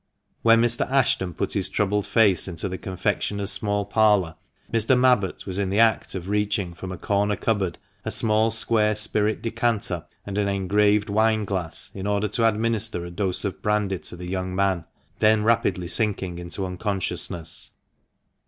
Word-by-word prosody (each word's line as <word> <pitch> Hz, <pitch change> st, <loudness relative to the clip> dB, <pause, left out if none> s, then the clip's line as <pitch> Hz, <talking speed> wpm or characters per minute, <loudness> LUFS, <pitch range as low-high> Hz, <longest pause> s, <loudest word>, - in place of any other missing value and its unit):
When 115 Hz, 0 st, +5 dB
Mr. 120 Hz, +1 st, +1 dB
Ashton 110 Hz, -, +1 dB
put -, -, -2 dB
his -, -, +1 dB
troubled 105 Hz, 0 st, 0 dB
face 100 Hz, -4 st, +3 dB
into 85 Hz, +1 st, -3 dB
the 95 Hz, -1 st, -5 dB
con 95 Hz, -1 st, -7 dB
fectioner's 100 Hz, +1 st, 0 dB
small 105 Hz, -1 st, +1 dB
parlour, 105 Hz, -7 st, +2 dB, 0.4 s
Mr. 115 Hz, +3 st, +3 dB
Mabbott 125 Hz, -7 st, +2 dB
was 95 Hz, 0 st, -3 dB
in 100 Hz, -2 st, -1 dB
the 100 Hz, -, -1 dB
act 110 Hz, -3 st, +2 dB
of 90 Hz, -1 st, -5 dB
reaching 105 Hz, -3 st, -1 dB
from 95 Hz, +2 st, -8 dB
a 90 Hz, -, -6 dB
corner 105 Hz, +2 st, 0 dB
cupboard 100 Hz, -8 st, -1 dB, 0.3 s
a -, -, -3 dB
small 110 Hz, 0 st, +2 dB
square 110 Hz, -1 st, +2 dB
spirit 105 Hz, 0 st, +1 dB
decanter, 115 Hz, -7 st, -1 dB, 0.2 s
and 100 Hz, 0 st, -3 dB
an 100 Hz, -, +1 dB
engraved 100 Hz, +2 st, +2 dB
wine 110 Hz, 0 st, +2 dB
glass, 95 Hz, -5 st, -3 dB
in 95 Hz, 0 st, -5 dB
order 105 Hz, +1 st, 0 dB
to 115 Hz, -1 st, +2 dB
administer 110 Hz, -4 st, -1 dB
a 85 Hz, -, -8 dB
dose 95 Hz, +1 st, +1 dB
of 100 Hz, -, -4 dB
brandy 105 Hz, -3 st, 0 dB
to -, -, -8 dB
the 90 Hz, +1 st, -8 dB
young 95 Hz, 0 st, -3 dB
man, 95 Hz, -3 st, 0 dB, 0.3 s
then 110 Hz, 0 st, +4 dB
rapidly 110 Hz, -6 st, +1 dB
sinking 95 Hz, -3 st, -1 dB
into 90 Hz, +2 st, -5 dB
unconsciousness. 90 Hz, -3 st, -4 dB
100 Hz, 170 wpm, -24 LUFS, 95-110 Hz, 0.4 s, When